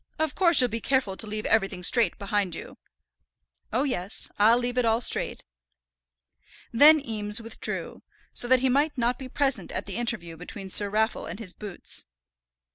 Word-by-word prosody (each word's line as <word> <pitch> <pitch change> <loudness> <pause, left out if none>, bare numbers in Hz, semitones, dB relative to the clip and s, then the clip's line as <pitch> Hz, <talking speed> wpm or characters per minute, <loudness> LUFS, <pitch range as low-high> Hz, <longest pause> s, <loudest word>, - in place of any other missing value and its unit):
Of 315 -2 -1
course 345 -2 +5
you'll 250 - +6
be 230 0 -5
careful 260 -8 0
to 220 - -4
leave 215 0 -5
everything 195 -4 0
straight 225 -1 +3
behind 200 -3 -2
you." - - -9 0.9
"Oh, 250 +5 0
yes; 210 -8 -3
I'll 225 +3 +5
leave 245 0 -2
it - - +1
all 225 0 +1
straight." 240 - +1 1.3
Then 300 +6 +7
Eames 215 -5 0
withdrew, 230 0 -5 0.3
so 245 - +1
that 255 0 +4
he 265 - +2
might 285 +3 +1
not 240 0 -1
be 260 -1 -8
present 275 0 -1
at - - -4
the 200 -1 -5
interview 220 -9 -4
between 195 +3 -8
Sir 205 +1 +6
Raffle 220 +2 -1
and - - -7
his 200 -5 -6
boots. 205 -4 -4
230 Hz, 175 wpm, -25 LUFS, 205-255 Hz, 1.3 s, Then